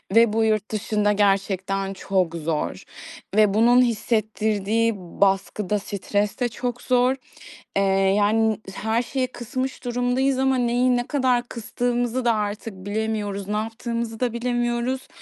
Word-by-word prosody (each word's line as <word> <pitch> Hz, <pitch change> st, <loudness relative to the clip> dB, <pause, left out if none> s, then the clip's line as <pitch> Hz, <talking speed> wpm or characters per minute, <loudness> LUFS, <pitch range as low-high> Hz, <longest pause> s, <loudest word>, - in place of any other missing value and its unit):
ve 230 Hz, -2 st, +6 dB
bu 225 Hz, 0 st, +2 dB
yurt 215 Hz, -1 st, 0 dB
dışında 210 Hz, -1 st, +1 dB
gerçekten 195 Hz, -1 st, 0 dB
çok 185 Hz, -3 st, -1 dB
zor 160 Hz, -1 st, -2 dB, 0.5 s
ve 210 Hz, -2 st, +5 dB
bunun 240 Hz, +3 st, +5 dB
hissettirdiği 220 Hz, -1 st, +1 dB
baskı 195 Hz, +2 st, 0 dB
da 210 Hz, -1 st, +2 dB
stres 205 Hz, +2 st, -2 dB
de 245 Hz, -2 st, +1 dB
çok 245 Hz, +2 st, -4 dB
zor. 250 Hz, +1 st, +2 dB, 0.6 s
Eee, -, -, +3 dB, 0.4 s
yani, 220 Hz, +1 st, +2 dB, 0.2 s
her 220 Hz, +3 st, 0 dB
şeyi 255 Hz, +1 st, -2 dB
kısmış 255 Hz, +2 st, -5 dB
durumdayız 245 Hz, +2 st, 0 dB
ama 265 Hz, 0 st, +2 dB
neyi 245 Hz, +1 st, +2 dB
ne 245 Hz, -, -2 dB
kadar 255 Hz, -4 st, +2 dB
kıstığımızı 245 Hz, +1 st, -2 dB
da 235 Hz, -, +4 dB
artık 210 Hz, 0 st, -3 dB
bilemiyoruz, 205 Hz, 0 st, -3 dB
ne 210 Hz, +1 st, -1 dB
yaptığımızı 225 Hz, +1 st, -4 dB
da 245 Hz, -2 st, 0 dB
bilemiyoruz. 240 Hz, +1 st, -1 dB
225 Hz, 135 wpm, -23 LUFS, 205-245 Hz, 0.6 s, ve